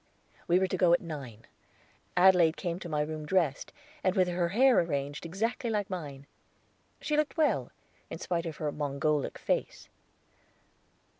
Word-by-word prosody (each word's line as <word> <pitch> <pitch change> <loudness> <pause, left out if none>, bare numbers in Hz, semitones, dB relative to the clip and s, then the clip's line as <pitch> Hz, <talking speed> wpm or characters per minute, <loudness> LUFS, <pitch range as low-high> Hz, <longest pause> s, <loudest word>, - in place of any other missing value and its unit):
We 175 - +4
were 190 - +3
to 185 0 -2
go 175 -2 +4
at 175 - +4
nine. 135 -9 -8 0.7
Adelaide 180 -3 +5
came 175 -2 -3
to 175 - -7
my 150 -1 0
room 155 +1 -4
dressed, 150 -3 0 0.3
and 185 0 +1
with 185 -2 +3
her 175 -1 0
hair 255 +6 +5
arranged 145 -1 -2
exactly 225 +7 -2
like 205 -3 -2
mine. 145 -6 -6 0.7
She 300 - -1
looked 305 +1 0
well, 310 -2 +1 0.4
in - - -6
spite 170 -1 -2
of 160 - -6
her 150 -2 -2
Mongolic 145 0 -1
face. - - -2
170 Hz, 155 wpm, -30 LUFS, 150-190 Hz, 0.7 s, Adelaide